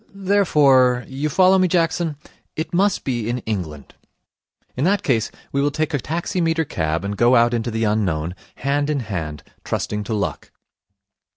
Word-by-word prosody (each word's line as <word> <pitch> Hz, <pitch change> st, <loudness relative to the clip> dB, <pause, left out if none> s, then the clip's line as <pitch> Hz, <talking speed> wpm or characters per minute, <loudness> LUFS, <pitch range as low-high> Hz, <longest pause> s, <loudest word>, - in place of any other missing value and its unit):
Therefore 145 Hz, -11 st, +3 dB
you 140 Hz, +3 st, -3 dB
follow 185 Hz, +3 st, +4 dB
me, 185 Hz, -, +4 dB
Jackson? 165 Hz, -2 st, 0 dB, 0.4 s
it 160 Hz, +3 st, -4 dB
must 195 Hz, +3 st, +2 dB
be 120 Hz, -4 st, -2 dB
in 120 Hz, -, -1 dB
England. 85 Hz, -10 st, -5 dB, 0.8 s
In 130 Hz, -, -2 dB
that 195 Hz, +4 st, +2 dB
case, 115 Hz, -5 st, +1 dB, 0.2 s
we 140 Hz, -, 0 dB
will 145 Hz, -, +2 dB
take 155 Hz, +2 st, -2 dB
a 145 Hz, -, +1 dB
taximeter 165 Hz, -, -1 dB
cab, 80 Hz, -, -2 dB
and 100 Hz, +1 st, -3 dB
go 120 Hz, +4 st, +4 dB
out 120 Hz, 0 st, +4 dB
into 115 Hz, 0 st, -1 dB
the 115 Hz, 0 st, -2 dB
unknown, 90 Hz, -7 st, 0 dB, 0.2 s
hand 145 Hz, +1 st, -1 dB
in 145 Hz, -3 st, 0 dB
hand, 80 Hz, -, -5 dB, 0.2 s
trusting 105 Hz, 0 st, -2 dB
to 110 Hz, -, -2 dB
luck.' 100 Hz, -, -3 dB
130 Hz, 165 wpm, -21 LUFS, 110-165 Hz, 0.8 s, follow